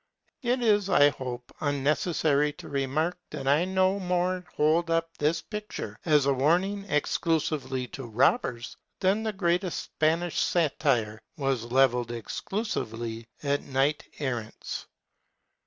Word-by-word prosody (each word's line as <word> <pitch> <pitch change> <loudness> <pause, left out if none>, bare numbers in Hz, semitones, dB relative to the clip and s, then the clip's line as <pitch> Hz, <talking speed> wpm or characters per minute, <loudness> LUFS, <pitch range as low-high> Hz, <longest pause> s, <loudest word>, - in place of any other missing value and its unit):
It 250 0 0
is, 205 -3 +3
I 145 0 +6
hope, 125 -3 -6
unnecessary 145 +1 +1
to - - -11
remark 145 +5 -1
that 135 - -6
I 145 +5 +4
no 190 +1 +2
more 180 0 0
hold 160 +3 +3
up 165 0 0
this 155 +2 +1
picture 210 0 -6
as 150 -4 +4
a 140 - +3
warning 180 +9 +1
exclusively 150 -3 0
to 135 -3 -7
robbers 120 - +1 0.2
than 195 +3 +2
the 220 -1 -1
greatest 180 -2 0
Spanish 165 +2 +1
satire 135 -10 +1 0.2
was 135 -5 0
levelled 125 -1 +3
exclusively 115 - -4 0.2
at 145 0 +1
knight 140 +2 0
errants. 120 -6 -4
150 Hz, 125 wpm, -28 LUFS, 135-180 Hz, 0.2 s, I